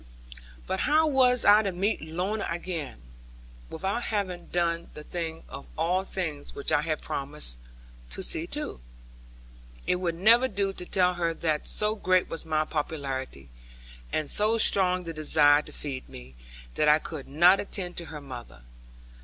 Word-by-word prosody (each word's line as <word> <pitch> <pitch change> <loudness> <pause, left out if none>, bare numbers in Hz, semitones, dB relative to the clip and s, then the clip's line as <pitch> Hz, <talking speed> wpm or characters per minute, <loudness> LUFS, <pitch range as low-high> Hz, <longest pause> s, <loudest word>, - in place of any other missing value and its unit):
But 190 - -2
how 310 +6 +4
was 255 -4 +3
I 205 +1 +8
to 200 -3 -1
meet 195 +5 0
Lorna 180 +7 -2
again, 170 - -4 0.7
without 195 +8 -2
having 190 -5 -2
done 170 -1 -1
the 150 - -8
thing 165 -1 -5
of - - -9
all 175 +4 +1
things 160 -7 -5
which 140 - -2
I 145 - +4
had 155 0 -2
promised 140 - -4 0.5
to 60 - -5
see - - -3
to? - - -3 1.1
It 180 - +2
would 175 -2 -1
never 230 +8 +5
do 200 -3 -1
to 180 - -8
tell 180 -1 +3
her 170 -2 -1
that 155 -3 -1
so 210 0 +2
great 185 -4 +2
was 165 0 -4
my 155 -1 +1
popularity, 135 - -4 0.6
and 155 -1 -1
so 215 +2 +2
strong 185 -4 +3
the 165 -1 -5
desire 150 -1 +4
to - - -12
feed 135 -3 -6
me, 65 +1 -11 0.4
that 150 - +1
I 150 0 +7
could 155 -3 -7
not 175 +7 +5
attend 180 -3 -4
to 170 - -3
her 150 -2 -8
mother. 120 - -10
170 Hz, 160 wpm, -27 LUFS, 150-190 Hz, 1.1 s, I